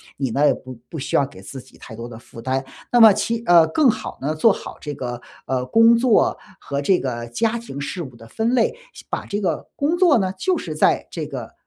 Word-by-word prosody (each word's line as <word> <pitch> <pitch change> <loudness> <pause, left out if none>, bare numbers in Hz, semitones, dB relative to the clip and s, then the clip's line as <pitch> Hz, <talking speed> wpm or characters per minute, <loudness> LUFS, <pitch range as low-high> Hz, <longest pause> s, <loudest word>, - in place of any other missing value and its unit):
你 135 -3 -2
呢 140 +5 +2
也 - - +4
不 130 0 -10
不 160 - -7
需 140 - -1
要 140 - +3
给 140 - -14
自 135 - -9
己 - - -20
太 115 - -12
多 115 +2 -7
的 115 -2 -10
负 115 0 -13
担。 130 +2 -1 0.3
那 240 - +4
么 220 -1 +10
其 230 +3 -1
呃， 170 -2 +7
更 260 - +3
好 - - -3
呢 145 +3 -1
做 195 +7 +4
好 - - -9
这 150 - -6
个， 125 -3 -5 0.3
呃， 130 -1 -1
工 230 - +5
作 235 -2 +3 0.2
和 140 0 -4
这 180 +6 +3
个 120 -3 -4
家 220 - 0
庭 230 -12 -8
事 175 +5 -4
务 130 -5 -10
的 115 -1 -14
分 225 - -1
类， 475 - +2 0.2
先 - - -13
把 - - -3
这 205 +1 -3
个 170 -6 -2
工 300 +5 0
作 345 -6 +5
呢， 190 -2 0
就 370 - 0
是 - - -5
在 - - +2
这 - - -5
个， - - -7
160 Hz, 260 characters per minute, -21 LUFS, -, 0.3 s, 么